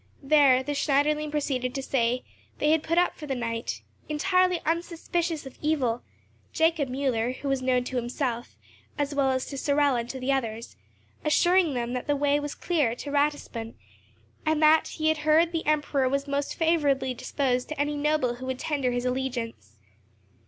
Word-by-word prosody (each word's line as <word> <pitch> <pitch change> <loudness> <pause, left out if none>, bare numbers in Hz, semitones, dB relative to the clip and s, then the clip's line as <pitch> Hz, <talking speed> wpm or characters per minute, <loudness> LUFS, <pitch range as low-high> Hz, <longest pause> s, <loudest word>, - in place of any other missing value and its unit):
There, 275 -3 +5
the 290 - -3
Schneiderlein 295 +1 +1
proceeded 265 -4 -2
to 270 - -3
say, 250 -2 0 0.3
they 300 +2 +3
put 330 +2 -2
up 355 - +3
for 300 - -9
the 270 - -1
night, 230 -1 -3 0.3
entirely 365 +3 +2
unsuspicious 335 -1 -2
of 265 - -11
evil; 260 -6 0 0.5
Jacob 320 -4 +2
Müller, 250 -2 -1
who 285 - -6
was 270 -1 0
known 255 -1 +2
to 255 +1 -4
himself, 240 0 -3 0.4
as 290 0 -1
well 280 -1 +2
as 260 -1 0
to 275 - -6
Sorel 285 -1 +2
and 235 0 -3
to 265 - -5
the 255 +2 0
others, 230 -4 -2 0.5
assuring 345 0 +3
them 240 0 -2
that 250 +2 -4
the 290 - +2
way 285 0 +2
was 290 0 -5
clear 295 -10 0
to 285 +3 -7
Ratisbon, 285 -6 -1 0.7
and 315 -1 +1
that 310 +1 +5
he 315 0 +1
heard 310 +2 +3
the 330 -3 -3
Emperor 295 -3 +1
was 275 +1 -1
most 280 0 -2
favourably 285 -6 +1
disposed 250 0 -1
to 305 - -5
any 295 +1 0
noble 290 -5 0
who 260 +1 -7
would 260 -1 -2
tender 275 -2 -1
his 245 0 -2
allegiance. 240 - -3
280 Hz, 175 wpm, -27 LUFS, 255-305 Hz, 0.7 s, There